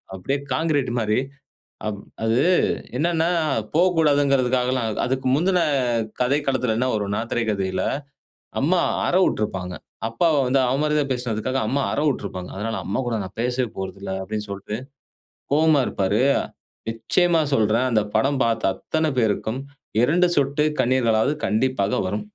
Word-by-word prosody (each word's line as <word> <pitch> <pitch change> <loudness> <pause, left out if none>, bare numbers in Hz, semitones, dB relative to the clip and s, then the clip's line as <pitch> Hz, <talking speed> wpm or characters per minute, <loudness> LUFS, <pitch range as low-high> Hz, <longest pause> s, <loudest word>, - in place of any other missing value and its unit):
அப்படியே 135 +10 -2
கான்கிரீட் 145 -6 0
மாரி, 110 0 +1 0.7
அப் 100 -2 -3 0.2
அது 115 +2 +2 0.6
என்னனா, 165 +2 +1 0.5
போகக்கூடாதுங்கறதுக்காகலாம் 140 -7 +2 0.2
அதுக்கு 130 +1 -1
முந்தின 180 +3 +2 0.6
கதைக்களத்தில 130 -3 +1
என்ன 130 +2 +1
வரும்னா? 105 0 -1
திரைக்கதையில, 100 -5 -1 0.8
அம்மா 175 +6 +3 0.3
அற - - 0
விட்டுருப்பாங்க. 90 -4 -2 0.3
அப்பாவ 165 +7 +2
வந்து 135 +2 +3
அவ 125 - +1
மரியாதையா 150 -2 +1
பேசினதுக்காக 125 +1 -1
அம்மா 140 +4 0
அற - - -1
விட்டுருப்பாங்க. 95 -8 -3
அதனால 110 +3 -3
அம்மா 100 +7 -2
கூட 115 - 0
நான் 95 - -10
பேசவே 125 0 0
போறதில்லனு 95 +2 -4
சொல்ட்டு 100 +1 -5 0.8
கோவமா 155 -1 +4
இருப்பாரு. 100 +3 0 0.7
நிச்சயமா 170 +9 +2
சொல்றேன். 110 +2 +2
அந்த 110 -2 +3
படம் 135 0 +1
பார்த்த 115 -4 +1
அத்தன 160 +8 -1
பேருக்கும் 110 +2 0 0.4
2 175 +7 +3
சொட்டு 140 +2 +1 0.2
கண்ணீர்களாவது 120 +1 +2
கண்டிப்பாக 110 -2 +1
வரும். 105 +3 -2
125 Hz, 120 wpm, -23 LUFS, 110-145 Hz, 0.8 s, கோவமா